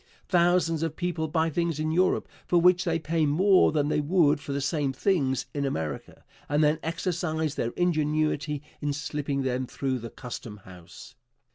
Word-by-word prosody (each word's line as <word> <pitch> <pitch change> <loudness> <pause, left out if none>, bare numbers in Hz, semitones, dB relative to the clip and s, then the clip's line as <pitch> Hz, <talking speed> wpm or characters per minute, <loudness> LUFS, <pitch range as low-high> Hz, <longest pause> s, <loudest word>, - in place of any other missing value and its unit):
Thousands 175 -2 +2
of 165 -1 -2
people 175 -3 -2
buy 160 +1 0
things 170 -1 -1
in 155 0 -1
Europe 180 +3 +2 0.2
for 175 - +4
which 180 +1 +4
they 165 -2 +1
pay 160 0 0
more 185 +6 +4
than 145 -2 +1
they 150 - +1
would 150 -2 +3
for - - -6
the 140 - -1
same 140 0 0
things 135 - 0
in 145 - -2
America, 80 - -4 0.3
and 145 +1 +2
then 150 +1 +3
exercise 165 -2 -2
their 115 - -2
ingenuity 155 -3 0 0.2
in 145 -1 -1
slipping 145 -1 -3
them 130 0 -1
through 130 -1 -2
the 115 0 -7
custom 115 -3 -8
house. 90 +5 -13
155 Hz, 170 wpm, -27 LUFS, 140-170 Hz, 0.3 s, for